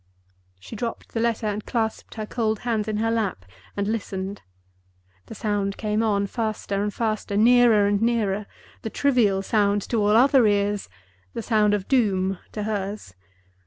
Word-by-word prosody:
She 225 - -10
dropped 230 +2 -5
the 225 - -3
letter 230 -1 0
and 210 0 -2
clasped 225 -3 -3
her 215 -2 -4
cold 220 -2 -1
hands 225 -3 -1
in 215 -1 -1
her 225 +1 0
lap 205 - -2 0.3
and 200 0 -1
listened. 200 -2 -4 0.9
The - - -9
sound 205 -2 -1
came 215 0 -1
on, 205 -3 +1
faster 215 -2 -2
and 210 0 -1
faster, 215 -2 -2
nearer 230 -2 +5
and 205 0 +1
nearer—the 220 -2 -2
trivial 220 -8 +2
sound 205 -1 +1
to 235 - 0
all 210 +1 +4
other 265 -1 +5
ears; 205 0 0 0.5
the - - -3
sound 210 -2 +3
of 195 -2 -4
Doom 195 -7 +1
to 210 - -4
hers. 205 - -4
210 Hz, 160 wpm, -24 LUFS, 200-225 Hz, 0.9 s, nearer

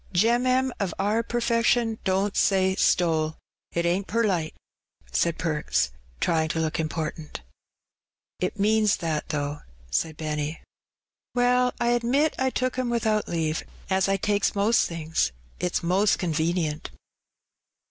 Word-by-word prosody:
"Gem'mem 250 +6 +3
of 195 -5 -2
our 210 +4 +1
per 240 +1 -2
fession 230 -1 +2
don't 195 +1 0
say 190 -1 +3
stole, 160 -4 +2 0.3
it 170 0 -1
ainH 180 +3 0
perlite/' 195 -8 0 0.6
said 165 - +1
Perks, 155 - 0 0.3
trying 160 -1 +1
tp - - -2
look 160 0 -1
important. 155 - -4 1.0
''It 185 +3 -1
means 215 0 +3
that, 160 -3 -3
though,'' 145 -1 -2 0.3
said 155 - 0
Benny. 150 0 -3 0.8
"Well, 250 0 +3
I 235 - +2
admit 245 +6 +2
I 260 0 +2
took 255 0 -1
'em 250 -1 0
without 220 -3 +1
leave, 160 -2 -1 0.3
as 190 +1 +2
I 195 - +2
takes 205 +2 +1
most 210 +4 +3
things; 165 - -1 0.3
it's 180 0 -1
most 190 +4 +3
conwenient." 160 -2 -1
190 Hz, 130 wpm, -26 LUFS, 160-230 Hz, 1.0 s, Gem'mem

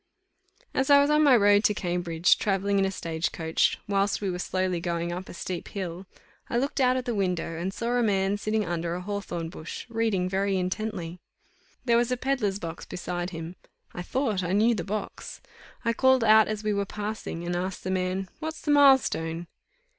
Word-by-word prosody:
As 265 +1 0
I 285 0 +8
was 285 +1 +3
on 300 0 +4
my 285 -4 +6
road 205 -1 +5
to 210 - +3
Cambridge, 175 -2 +1
travelling 200 0 +1
in 195 - +3
a 190 - -1
stagecoach, 160 -2 -1
whilst 200 0 +1
we 195 -2 -2
were 180 - -4
slowly 185 -1 -1
going 170 0 -2
up 180 +2 -6
a - - -8
steep 175 0 -5
hill, 185 -1 -6 0.4
I 235 - 0
looked 275 +3 0
out 255 0 +4
of 255 - -3
the 240 - -1
window, 180 -5 -1
and 185 +3 -2
saw 235 +4 -3
a 245 0 +2
man 200 -2 +1
sitting 215 +1 -1
under 170 -1 -2
a 180 - -4
hawthorn 180 -4 -4
bush, 160 -1 -8
reading 225 -5 0
very 195 +1 0
intently. 185 -2 -3 0.7
There 235 -2 +4
was 240 +1 +1
a 250 - +1
pedlar's 240 -7 0
box 165 -3 -7
beside 175 0 -4
him; 165 +1 -7 0.4
I 175 - -5
thought 220 0 -1
I 180 +1 -1
knew 220 +4 +4
the 190 -6 -3
box. 210 +3 -5 0.5
I 230 - +2
called 260 0 +4
out 220 0 +6
as 215 0 -3
we 215 0 0
were 200 0 0
passing, 210 -5 -5
and 175 0 -2
asked 185 +1 -3
the 185 - -2
man, 185 +1 -1
"What's 315 0 -5
the 300 - 0
mile 285 -2 +8
stone?" 165 -7 -4
195 Hz, 200 wpm, -27 LUFS, 175-225 Hz, 0.7 s, I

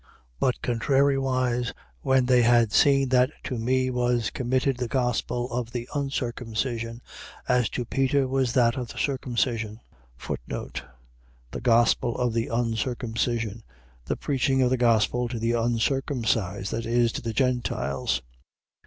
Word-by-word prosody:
2:7. - - -31 0.3
But 125 - 0
contrariwise, 130 -1 +1 0.3
when 130 -1 +3
they 125 -1 +4
had 120 -2 +4
seen 135 +2 +4
that 125 0 +4
to 125 -4 -3
me 130 +2 +1
was 120 -2 0
committed 130 +1 0
the 125 -1 -2
gospel 125 -1 -1
of 120 -1 -3
the 120 -1 -4
uncircumcision, 120 -4 -3 0.4
as 125 -4 +2
to 125 - -3
Peter 135 +2 +1
was 130 -2 0
that 120 -2 +3
of 125 -2 -3
the - - -10
circumcision. 120 -5 -1 0.5
The - - -8
gospel 120 0 +3
of 125 -2 0
the 115 0 0
uncircumcision.. 115 -1 -1 0.4
.The - - -2
preaching 135 -1 +1
of 125 - +2
the - - +4
gospel 120 0 +2
to 120 0 -4
the 115 +1 0
uncircumcised, 115 -4 0
that 115 0 -3
is, 120 0 +2
to - - -5
the 115 -1 -4
Gentiles. 120 - -1
120 Hz, 135 wpm, -26 LUFS, 115-130 Hz, 0.5 s, they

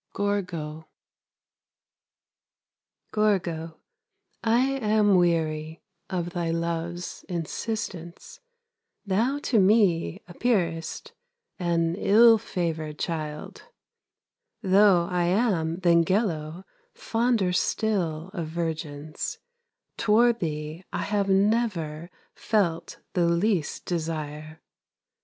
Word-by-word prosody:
GORGO 170 -6 -3 2.2
Gorgo, 170 -7 0 0.7
I 230 +2 +3
am 210 -4 +3
weary 160 -2 0 0.3
Of 175 -2 -2
thy 170 -1 -2
love's 170 +1 -3
insistence, 175 0 -5 0.7
Thou 225 +8 +1
to 230 - +2
me 195 -3 +3
appearest 175 -5 -1 0.5
An 170 -2 +1
ill 225 +4 +6
favored 160 -7 -3
child. 155 -3 -5 1.0
Though 190 -2 +5
I 180 -1 0
am 175 -4 +1
than 170 -1 +5
Gello 170 -3 -1 0.3
Fonder 225 -5 +1
still 180 -5 -1
of 170 -5 -4
virgins, 155 -2 -4 0.6
Toward 230 +2 +3
thee 155 +1 -4
I - - -2
have 200 -1 0
never 190 -6 +1 0.2
Felt 190 -7 -1 0.2
the 175 -2 +2
least 170 -1 0
desire. 155 -2 -4
175 Hz, 85 wpm, -26 LUFS, 160-205 Hz, 2.2 s, ill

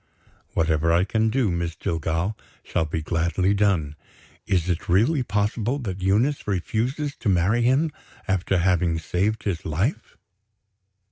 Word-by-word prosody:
"Whatever 80 0 +2
I 85 +2 +4
can 110 +3 +1
do, 120 -4 +1
Miss 85 -1 -2
Jillgall, 80 +6 -2 0.3
shall 80 - -1
be 80 0 -3
gladly 85 +4 +1
done. 95 -8 +1 0.5
Is 90 -3 +1
it 85 -1 -2
really 115 - +3
possible 105 +3 0
that 100 -8 -5
Eunice 110 +10 +1
refuses 120 - -1
to 110 - -1
marry 95 +6 +2
him, 135 +7 +2 0.4
after 95 0 +1
having 85 -2 +2
saved 95 +7 -1
his 95 -6 -2
life?" 90 - -2
95 Hz, 135 wpm, -24 LUFS, 85-110 Hz, 0.5 s, I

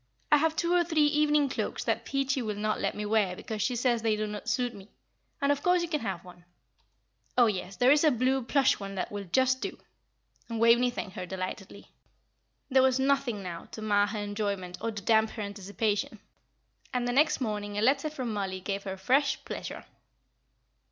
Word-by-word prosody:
I 295 - +8
have 320 +2 +1
two 340 +2 +1
or 355 -1 +4
three 320 -3 +2
evening 295 -1 +3
cloaks 260 - -3
that - - -1
Peachy 275 -1 0
will 215 -3 -3
not 215 +1 -1
let - - -1
me 210 - -4
wear 205 -4 +1
because 215 +3 -5
she 250 +4 0
says 240 -1 +1
they 220 -1 +2
do 215 0 -2
not 210 -1 -5
suit 245 -2 0
me, 200 +1 -13 0.5
and 280 0 +2
of 285 - 0
course 360 -1 +3
you - - -2
can 305 -2 -1
have 190 -5 -4
one. 175 -1 -14 0.9
Oh, 245 - +7
yes, 195 -3 -2
there 250 +2 +4
is 295 +1 +5
a 310 - +6
blue 260 +1 +1
plush 270 +2 +2
one 195 -1 -6
that 185 - -3
will 205 -1 -5
just 260 +7 +2
do." - - -4 0.7
And 230 -1 -3
Waveney 235 +2 +5
thanked 215 -6 -6
her 180 -1 -4
delightedly. 190 +2 -6 0.8
There 265 -1 +4
was 260 0 +3
nothing 265 -6 +1
now 170 -2 -6
to 220 - -6
mar 205 -1 +3
her 210 +2 -4
enjoyment 205 -3 -3
or 230 - -1
to 210 -3 -6
damp 220 0 +4
her 215 - -2
anticipation. 205 +1 -2 0.7
And 245 -1 -1
the - - +1
next 300 +3 +3
morning 210 -4 -3
a - - +1
letter 275 +5 +3
from 255 -7 -4
Mollie 190 -2 -3
gave 195 +1 -4
her 190 0 -4
fresh 260 +9 +1
pleasure. - - -6
225 Hz, 205 wpm, -29 LUFS, 205-270 Hz, 0.9 s, I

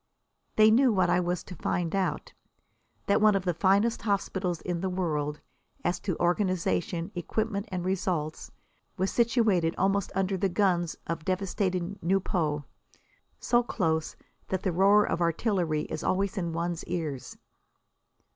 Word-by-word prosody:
They 215 0 +6
knew 250 +2 +5
what 185 -4 +2
I 180 - +3
was 175 0 -1
to 185 - -9
find 170 +1 -1
out 195 - -2 0.7
that 200 - +2
one 215 -1 +5
of 195 -1 -1
the 175 - +1
finest 200 +6 +2
hospitals 190 -4 -1
in 175 -2 -3
the 190 - -1
world, 150 -5 -2 0.4
as 175 0 0
to 185 -2 -3
organisation, 180 0 0
equipment 205 +4 -2
and 180 -1 -3
results, 175 -4 -2 0.5
was 190 +1 0
situated 220 -8 +2
almost 195 0 +1
under 195 0 0
the 190 +1 +1
guns 175 -3 +1
of 165 -2 -4
devastated 185 0 -2
Nieuport, 170 -5 0 0.8
so 240 0 +3
close 160 -9 -1 0.3
that 190 0 -2
the 185 - +1
roar 200 +4 +5
of 175 - -2
artillery 170 -2 +1
is - - -5
always 195 +2 0
in 175 -4 -2
one's 170 0 -2
ears. 160 -7 -4
185 Hz, 145 wpm, -28 LUFS, 170-200 Hz, 0.8 s, They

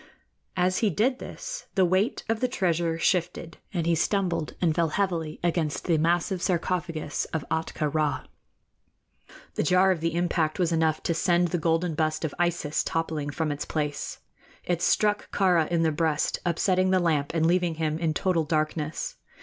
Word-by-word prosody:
As 185 +1 +2
he 220 - +2
did 250 - +1
this, - - -7
the 190 -2 +4
weight 185 +6 +1
of 225 -1 0
the 255 - +1
treasure 170 -8 0
shifted, 170 -1 -1
and 175 -5 -1
he 170 - +3
stumbled 175 -2 0
and 170 -3 +2
fell 165 0 +1
heavily 165 -3 -1
against 165 -3 -1
the 165 -4 +2
massive 175 +3 +1
sarcophagus 170 -4 -1
of 160 -3 -4
Ahtka 160 -2 -1
Rā. 155 -1 0 1.3
The - - -1
jar 185 +4 +4
of 180 - 0
the 165 +1 -1
impact 170 -3 0
was 175 -3 +1
enough 160 -1 +1
to 170 - +1
send 175 +1 +2
the 175 - -1
golden 165 +1 +1
bust 155 +1 0
of 150 - -3
Isis 175 -4 0
toppling 160 -3 -2
from 155 +1 -2
its 145 - -3
place. 150 -2 -3 0.5
It 175 -1 -1
struck 210 +2 +2
Kāra 180 -5 +3
in 170 -1 +1
the 160 - +2
breast, 155 -1 0
upsetting 185 +2 +2
the 190 - +4
lamp 155 -5 +1
and 160 -1 +2
leaving 175 -1 +2
him 155 0 -1
in 160 -2 0
total 180 -4 +1
darkness. 155 0 -2
170 Hz, 175 wpm, -26 LUFS, 155-180 Hz, 1.3 s, the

